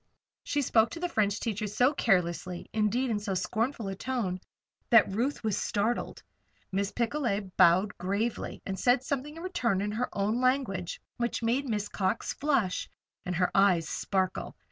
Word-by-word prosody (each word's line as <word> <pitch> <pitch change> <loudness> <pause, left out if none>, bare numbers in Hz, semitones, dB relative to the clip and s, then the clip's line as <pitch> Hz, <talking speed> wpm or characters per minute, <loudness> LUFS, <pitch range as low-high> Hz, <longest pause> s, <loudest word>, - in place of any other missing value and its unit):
She 290 0 0
spoke 225 -2 +4
to 335 - -7
the 355 - -1
French 205 -8 +1
teacher 215 -2 -2
so 250 +7 +3
carelessly 180 - 0
indeed, 220 +4 +1
in 210 - 0
so 205 -2 -3
scornful 225 +5 -1
a 195 - -2
tone 200 -4 -2 0.5
that 230 -4 +6
Ruth 240 +8 -1
was 215 -3 +1
startled. 220 +4 -1 0.5
Miss 195 +1 -1
Picolet 230 -6 -1
bowed 185 +4 +5
gravely 200 +6 -2
and 190 -1 -4
said 245 +2 +3
something 285 +3 -3
in 330 - -8
return 245 - 0
in 205 +1 -1
her 235 +4 -1
own 210 +5 0
language 255 -9 0 0.2
which 235 0 -2
made 255 +5 +1
Miss 210 -2 -1
Cox 190 +2 -1
flush, 270 -11 0 0.4
and 180 - -1
her 180 +1 +1
eyes 185 -5 +4
sparkle. 190 +2 -2
215 Hz, 165 wpm, -29 LUFS, 195-250 Hz, 0.5 s, that